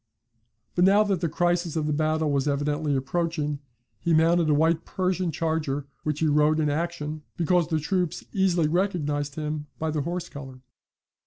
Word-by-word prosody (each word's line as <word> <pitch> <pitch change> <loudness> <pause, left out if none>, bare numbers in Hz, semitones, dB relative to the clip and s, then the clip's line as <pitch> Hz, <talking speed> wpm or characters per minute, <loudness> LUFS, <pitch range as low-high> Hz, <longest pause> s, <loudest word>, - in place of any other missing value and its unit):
But 175 - +2
now 200 +3 +6
that 195 -4 -1
the 170 - 0
crisis 175 0 0
of 155 -2 0
the 150 - 0
battle 155 0 +1
was 140 0 +1
evidently 145 +1 0
approaching, 150 +1 -1 0.4
he 170 -1 +2
mounted 165 0 +3
a - - +4
white 160 +2 +2
Persian 185 -1 -1
charger, 155 -3 -1 0.2
which 150 0 -2
he - - +3
rode 150 +1 +3
in 150 -2 +1
action 155 -1 -3 0.2
because 175 -1 +2
the 160 -2 0
troops 180 +2 -1
easily 180 -5 +2
recognised 150 -5 -1
him 150 -1 -4
by 160 0 -2
the 150 -1 -1
horse 175 +3 -3
colour. 135 -4 -10
155 Hz, 170 wpm, -26 LUFS, 150-175 Hz, 0.4 s, now